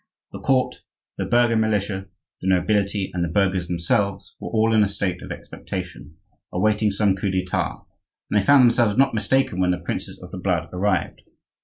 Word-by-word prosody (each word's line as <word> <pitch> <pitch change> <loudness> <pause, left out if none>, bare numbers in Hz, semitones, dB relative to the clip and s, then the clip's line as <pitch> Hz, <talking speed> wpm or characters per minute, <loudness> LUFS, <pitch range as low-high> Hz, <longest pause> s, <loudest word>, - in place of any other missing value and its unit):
The - - -8
court, 130 -1 +1 0.4
the - - -2
burgher 120 -1 +3
militia, 105 -3 0 0.3
the 95 - -3
nobility, 100 +1 +1
and 90 -1 -1
the - - 0
burghers 95 0 +1
themselves 100 +3 -1
were - - -6
all 110 0 +2
in 110 - +5
a 105 - +4
state 100 -2 -3
of - - -8
expectation, 90 -4 -7 0.3
awaiting 105 +3 +2
some 100 -1 +1
coup 100 +1 -2
d'Etat; 95 -1 -2 0.5
and 105 - +4
they - - -5
found 140 +3 +6
themselves 115 -3 +3
not 135 0 +4
mistaken 110 -2 +1
when 90 -1 +2
the 90 - +1
princes 85 - -5
of - - -11
the 95 - -6
blood 90 -3 -1
arrived. 95 +2 -1
100 Hz, 180 wpm, -23 LUFS, 90-110 Hz, 0.5 s, found